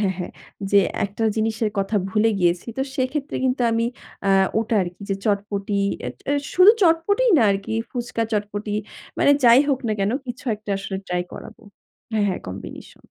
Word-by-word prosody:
হ্যাঁ, 195 Hz, -3 st, +1 dB
হ্যাঁ 180 Hz, -, -5 dB, 0.4 s
যে 200 Hz, -1 st, +6 dB, 0.2 s
একটা 205 Hz, +3 st, -3 dB
জিনিসের 220 Hz, 0 st, 0 dB
কথা 195 Hz, +2 st, 0 dB
ভুলে 220 Hz, +2 st, +3 dB
গিয়েছি। 175 Hz, +2 st, +1 dB
তো -, -, +2 dB
সেক্ষেত্রে 270 Hz, +2 st, -2 dB
কিন্তু 255 Hz, -1 st, +1 dB
আমি 230 Hz, +1 st, +1 dB, 0.4 s
আ -, -, +4 dB, 0.3 s
ওটা 225 Hz, 0 st, -1 dB
আরকি 175 Hz, +2 st, -7 dB
যে -, -, +2 dB
চটপটি 200 Hz, -1 st, -1 dB, 0.3 s
এ -, -, -1 dB, 0.2 s
এ -, -, +3 dB, 0.2 s
শুধু 370 Hz, +3 st, +8 dB
চটপটিই 405 Hz, +8 st, +3 dB
না -, -, +4 dB
আরকি 195 Hz, +2 st, -2 dB, 0.2 s
ফুচকা, 240 Hz, -2 st, -3 dB
চটপটি 210 Hz, 0 st, -2 dB, 0.5 s
মানে 285 Hz, -, +4 dB
যাই 240 Hz, +2 st, +8 dB
হোক 270 Hz, -2 st, +2 dB
না -, -, +1 dB
কেনো 200 Hz, +4 st, +1 dB
কিছু 245 Hz, +1 st, -7 dB
একটা 210 Hz, 0 st, -9 dB
আসলে 195 Hz, 0 st, -5 dB
ট্রাই 180 Hz, 0 st, -1 dB
করাবো। 225 Hz, +1 st, -10 dB, 0.5 s
হ্যাঁ, 215 Hz, -2 st, +2 dB
হ্যাঁ 185 Hz, -, -2 dB
কম্বিনেশন। 95 Hz, +1 st, -9 dB
215 Hz, 175 wpm, -22 LUFS, 200-245 Hz, 0.5 s, শুধু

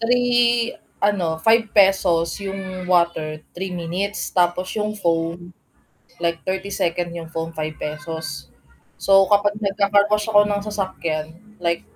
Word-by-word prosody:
3 240 Hz, 0 st, +2 dB, 0.3 s
ano, 180 Hz, -6 st, +1 dB
₱5 195 Hz, -5 st, +3 dB
yung 190 Hz, -2 st, -5 dB
water, 160 Hz, -3 st, +1 dB
3 190 Hz, +2 st, -4 dB
minutes, 180 Hz, +4 st, -3 dB
tapos 180 Hz, +1 st, +1 dB
yung 215 Hz, 0 st, -2 dB
phone, 170 Hz, -1 st, -1 dB, 0.7 s
like 170 Hz, 0 st, 0 dB
30 190 Hz, +1 st, -2 dB
seconds 175 Hz, -2 st, -1 dB
yung 170 Hz, -1 st, -7 dB
phone 165 Hz, 0 st, -4 dB
₱5. 155 Hz, 0 st, -5 dB, 0.5 s
So, 195 Hz, 0 st, +5 dB
kapag 205 Hz, +1 st, +3 dB
nagkaka-carwash 205 Hz, +1 st, +2 dB
ako 205 Hz, -1 st, +6 dB
ng 205 Hz, -1 st, -1 dB
sasakyan, 170 Hz, -6 st, -3 dB, 0.2 s
like 170 Hz, 0 st, 0 dB
185 Hz, 115 wpm, -22 LUFS, 170-205 Hz, 0.7 s, ako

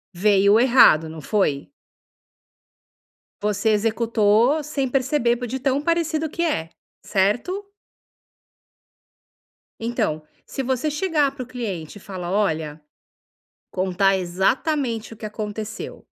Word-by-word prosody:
Veio 200 Hz, +2 st, +4 dB
errado, 235 Hz, -11 st, +5 dB
não 160 Hz, 0 st, -8 dB
foi? 150 Hz, -6 st, 0 dB, 1.7 s
Você 210 Hz, +1 st, 0 dB
executou, 225 Hz, +5 st, +2 dB
sem 280 Hz, -2 st, -2 dB
perceber, 260 Hz, -2 st, +1 dB
de 265 Hz, +3 st, -4 dB
tão 270 Hz, +2 st, 0 dB
parecido 320 Hz, -1 st, 0 dB
que 340 Hz, +3 st, -2 dB
é, 165 Hz, -, -1 dB, 0.4 s
certo? 240 Hz, -, 0 dB, 2.2 s
Então, 225 Hz, -9 st, -2 dB, 0.2 s
se 270 Hz, -, -4 dB
você 260 Hz, +3 st, -1 dB
chegar 300 Hz, -3 st, +1 dB
para 260 Hz, -, -5 dB
o -, -, -14 dB
cliente 205 Hz, -10 st, -5 dB
e -, -, -14 dB
falar: 180 Hz, -3 st, -6 dB
“Olha!”, 160 Hz, -7 st, -1 dB, 0.9 s
contar 190 Hz, +1 st, +1 dB
exatamente 225 Hz, -, -1 dB
o -, -, -17 dB
que 215 Hz, -, -7 dB
aconteceu, 215 Hz, 0 st, -6 dB
225 Hz, 105 wpm, -22 LUFS, 195-270 Hz, 2.2 s, errado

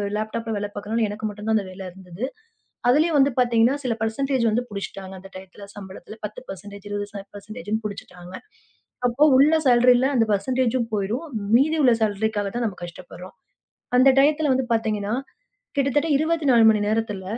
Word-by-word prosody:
லேப்டாப்ல 225 Hz, +2 st, -3 dB
வேல 205 Hz, 0 st, -3 dB
பாக்கிறனால, 215 Hz, +3 st, -2 dB
எனக்கு 210 Hz, +1 st, -6 dB
மட்டும்தான் 210 Hz, +2 st, -2 dB
அந்த 205 Hz, -, -2 dB
வேல 185 Hz, +1 st, -10 dB
இருந்தது. 185 Hz, +4 st, -7 dB, 0.6 s
அதுலயும் 305 Hz, +4 st, +3 dB
வந்து 275 Hz, 0 st, +4 dB
பாத்தீங்கன்னா 240 Hz, +1 st, +3 dB
சில 250 Hz, -3 st, 0 dB
பெர்ஸண்டேஜ் 255 Hz, +3 st, 0 dB
வந்து 240 Hz, +3 st, 0 dB
புடிச்சிட்டாங்க, 195 Hz, -2 st, -7 dB
அந்த 195 Hz, +1 st, -13 dB
டைம்ல 190 Hz, +2 st, -11 dB
சம்பளத்துல 195 Hz, +1 st, -10 dB
10% 200 Hz, -2 st, -9 dB
20% 205 Hz, +2 st, -6 dB
புடிச்சிட்டாங்க. 180 Hz, -3 st, -8 dB, 0.7 s
அப்போ 245 Hz, +5 st, +1 dB
உள்ள 290 Hz, +4 st, +5 dB
சாலரி 250 Hz, 0 st, +6 dB, 0.2 s
அந்த 230 Hz, -2 st, +3 dB
பெர்ஸன்டேஜும் 245 Hz, +3 st, 0 dB
போயிரும். 215 Hz, +10 st, -2 dB, 0.3 s
மீதி 310 Hz, +5 st, +3 dB
உள்ள 245 Hz, -3 st, +6 dB
சாலரிக்காக 210 Hz, -1 st, 0 dB
தான் 240 Hz, -, -1 dB
நாம 195 Hz, -, -8 dB
கஷ்டப்படுறோம். 180 Hz, +1 st, -10 dB, 0.6 s
அந்த 255 Hz, +2 st, +6 dB
டையத்துல 295 Hz, 0 st, +3 dB
வந்து 260 Hz, -1 st, -1 dB
பாத்தீங்கன்னா, 215 Hz, -1 st, -1 dB, 0.6 s
கிட்டத்தட்ட 280 Hz, +3 st, +1 dB
24 295 Hz, -7 st, +3 dB
மணி 215 Hz, -1 st, 0 dB
நேரத்துல, 215 Hz, -3 st, -2 dB
220 Hz, 140 wpm, -23 LUFS, 200-255 Hz, 0.7 s, சாலரி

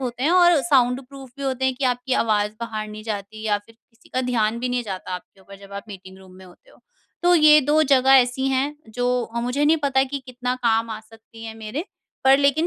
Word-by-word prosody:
होते 245 Hz, -1 st, -4 dB
हैं 300 Hz, -, +2 dB
और 350 Hz, -3 st, +5 dB
साउंड 250 Hz, 0 st, +2 dB
प्रूफ 270 Hz, -2 st, -12 dB
भी 280 Hz, -, -8 dB
होते 265 Hz, -1 st, -2 dB
हैं 260 Hz, -1 st, +1 dB
कि 265 Hz, -, -4 dB
आपकी 245 Hz, +1 st, -6 dB
आवाज़ 210 Hz, -2 st, 0 dB
बाहर 215 Hz, -2 st, -5 dB
नहीं 215 Hz, 0 st, -9 dB
जाती 215 Hz, 0 st, -6 dB
या 205 Hz, -1 st, +1 dB
फिर 225 Hz, -, -19 dB, 0.2 s
किसी 230 Hz, +2 st, -24 dB
का 255 Hz, -, +1 dB
ध्यान 225 Hz, -1 st, 0 dB
भी 250 Hz, -, -2 dB
नहीं 245 Hz, 0 st, -1 dB
जाता 190 Hz, -4 st, -6 dB
आपके 180 Hz, +2 st, -11 dB
ऊपर, 195 Hz, +1 st, -14 dB
जब 200 Hz, 0 st, -15 dB
आप 200 Hz, 0 st, -7 dB
मीटिंग 190 Hz, -1 st, -11 dB
रूम 190 Hz, -1 st, -16 dB
में 190 Hz, -, -14 dB
होते 185 Hz, -, -19 dB
हो। -, -, -22 dB, 0.4 s
तो 355 Hz, 0 st, +5 dB
ये 305 Hz, -2 st, +7 dB
2 300 Hz, +3 st, +2 dB
जगह 265 Hz, -2 st, +3 dB
ऐसी 250 Hz, +2 st, 0 dB
हैं, 270 Hz, +3 st, -1 dB
जो 245 Hz, +2 st, -1 dB
अ, 235 Hz, +1 st, -5 dB
मुझे 250 Hz, +5 st, -1 dB
नहीं 310 Hz, +2 st, +4 dB
पता 270 Hz, -2 st, +2 dB
है 270 Hz, -, +1 dB
कि 280 Hz, +1 st, -4 dB
कितना 250 Hz, 0 st, -3 dB
काम 225 Hz, 0 st, +1 dB
आ 215 Hz, -1 st, -5 dB
सकती 225 Hz, +1 st, -15 dB
हैं 225 Hz, -1 st, -7 dB
मेरे, 225 Hz, +8 st, -5 dB, 0.4 s
पर 270 Hz, +1 st, +6 dB
लेकिन 285 Hz, +3 st, +2 dB
245 Hz, 245 wpm, -22 LUFS, 215-270 Hz, 0.4 s, ये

